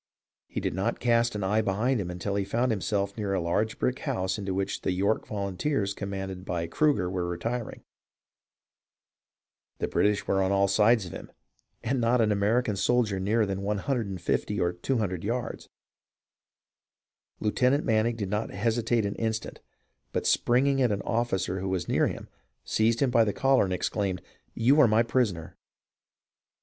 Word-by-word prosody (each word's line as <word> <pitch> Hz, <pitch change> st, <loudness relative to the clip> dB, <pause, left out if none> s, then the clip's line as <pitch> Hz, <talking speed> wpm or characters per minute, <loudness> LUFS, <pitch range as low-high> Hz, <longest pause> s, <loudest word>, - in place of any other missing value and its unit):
He -, -, -4 dB
did -, -, -2 dB
not 95 Hz, +6 st, -1 dB
cast 120 Hz, -1 st, +2 dB
an 105 Hz, -, -2 dB
eye 105 Hz, +3 st, +2 dB
behind 110 Hz, +4 st, 0 dB
him 90 Hz, -, -4 dB
until 90 Hz, +3 st, -3 dB
he 100 Hz, 0 st, 0 dB
found 115 Hz, +6 st, 0 dB
himself 100 Hz, -1 st, -1 dB
near 100 Hz, -3 st, -2 dB
a -, -, +1 dB
large 95 Hz, +6 st, -1 dB
brick 125 Hz, -, -1 dB
house 95 Hz, +2 st, -2 dB
into 100 Hz, -1 st, -3 dB
which 95 Hz, +1 st, -2 dB
the 95 Hz, -, 0 dB
York 100 Hz, +4 st, 0 dB
volunteers 100 Hz, +2 st, -1 dB
com 100 Hz, 0 st, -5 dB
manded 95 Hz, -2 st, -5 dB
by 85 Hz, -3 st, -2 dB
Cruger 140 Hz, -, +1 dB
were 90 Hz, -1 st, -2 dB
retiring. 115 Hz, +7 st, -4 dB, 1.9 s
The -, -, -2 dB
British 105 Hz, 0 st, +1 dB
were 95 Hz, -, +1 dB
on 95 Hz, 0 st, +1 dB
all 100 Hz, 0 st, +3 dB
sides 105 Hz, +2 st, +3 dB
of 90 Hz, -, -8 dB
him -, -, -9 dB, 0.5 s
and 125 Hz, +2 st, 0 dB
not 120 Hz, +2 st, +3 dB
an 110 Hz, -2 st, +3 dB
American 105 Hz, +3 st, +1 dB
soldier 105 Hz, -1 st, +1 dB
nearer 105 Hz, +4 st, +2 dB
than 100 Hz, -1 st, -3 dB
150 105 Hz, -2 st, -1 dB
or 85 Hz, -1 st, +1 dB
200 95 Hz, -2 st, -2 dB
yards. 120 Hz, +4 st, -3 dB, 1.7 s
Lieutenant 125 Hz, +7 st, +1 dB
Manning 115 Hz, +1 st, +2 dB
did 100 Hz, -4 st, -4 dB
not 105 Hz, +2 st, -1 dB
hesitate 115 Hz, +2 st, 0 dB
an 100 Hz, -, -1 dB
instant, 110 Hz, 0 st, -3 dB, 0.5 s
but -, -, -1 dB
springing 135 Hz, +3 st, +3 dB
at 125 Hz, -4 st, +3 dB
an 100 Hz, -1 st, -2 dB
officer 95 Hz, -6 st, -1 dB
who 95 Hz, +1 st, -3 dB
was 90 Hz, -2 st, -2 dB
near -, -, +2 dB
him -, -, -6 dB, 0.4 s
seized 115 Hz, +3 st, +1 dB
him 135 Hz, -3 st, +2 dB
by 115 Hz, -1 st, +5 dB
the 105 Hz, -2 st, -1 dB
collar 135 Hz, -4 st, +3 dB
and 95 Hz, -, -2 dB
exclaimed, 95 Hz, +1 st, -2 dB, 0.2 s
" -, -, -40 dB
You 140 Hz, +5 st, +6 dB
are 135 Hz, -, +7 dB
my 110 Hz, +1 st, +4 dB
prisoner 110 Hz, -9 st, -1 dB
105 Hz, 170 wpm, -27 LUFS, 95-115 Hz, 1.9 s, are